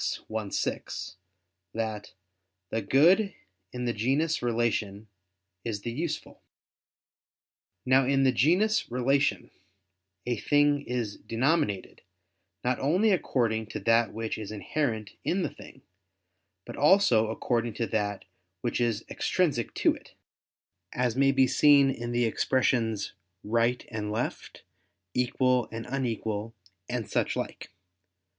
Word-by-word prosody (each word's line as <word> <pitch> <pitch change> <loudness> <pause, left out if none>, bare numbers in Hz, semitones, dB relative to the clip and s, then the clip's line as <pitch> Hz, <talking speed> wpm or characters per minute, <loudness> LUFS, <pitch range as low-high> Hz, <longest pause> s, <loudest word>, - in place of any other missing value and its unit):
i, 110 -2 -2
6) 95 - -3 0.6
that 110 -2 -4 0.6
"the 115 - 0
good 175 - +4 0.4
in 125 0 -4
the 120 - 0
genus 140 +9 0
'relation' 115 -4 -1 0.6
is 105 -4 -3
the 120 - -3
useful." 160 +7 -4 1.4
Now, 130 0 +4
in 135 0 +3
the 130 - +5
genus 180 - +2
"relation" 135 +3 +1 0.7
a 120 -1 -1
thing 145 +4 +3
is 120 -4 -2
denominated 120 - -1 0.6
not 125 0 0
only 180 +11 +3
according 115 - 0
to - - -5
that 115 -1 +3
which 110 0 -4
is 105 -1 -6
inherent 110 0 -2
in 185 +1 0
the - - -2
thing, - - -14 0.8
but - - -8
also 145 - +4
according 115 0 -1
to 115 - -1
that 105 -3 -2 0.4
which 120 0 -1
is 115 -2 0
extrinsic 145 - 0
to - - +3
it: - - -14 0.8
as 125 -2 0
may 135 +1 +4
be 135 -1 +4
seen 140 0 +5
in 120 -2 -5
the 120 0 +2
expressions 115 -2 0 0.3
"right" 115 +3 +1
and 105 -1 -3
"left," 110 +3 -4 0.5
"equal" 125 -1 +1
and 115 0 -6
"unequal," 115 -4 -3 0.3
and 120 -3 -3
such - - 0
like. - - -5
120 Hz, 125 wpm, -28 LUFS, 110-135 Hz, 1.4 s, the